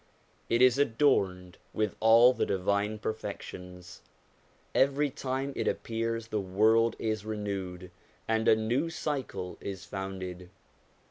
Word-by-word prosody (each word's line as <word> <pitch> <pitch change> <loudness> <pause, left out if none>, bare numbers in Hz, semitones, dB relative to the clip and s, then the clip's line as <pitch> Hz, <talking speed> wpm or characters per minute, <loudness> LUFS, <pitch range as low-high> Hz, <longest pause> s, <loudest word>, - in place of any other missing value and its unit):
It 120 +2 +4
is 130 +1 +5
adorned 100 - +1
with 110 -2 -1
all 115 +3 +7
the - - -1
divine 100 +2 0
perfections. 90 -5 -7 0.7
Every 140 +1 +2
time 135 +2 -3
it - - -2
appears 115 0 -2
the 110 - -1
world 110 +4 +3
is 110 -2 -2
renewed, 100 -4 -5 0.4
and 110 0 +1
a - - +7
new 115 +9 0
cycle 130 - -4
is 95 -2 -6
founded. 95 -2 -6
110 Hz, 120 wpm, -29 LUFS, 95-115 Hz, 0.7 s, all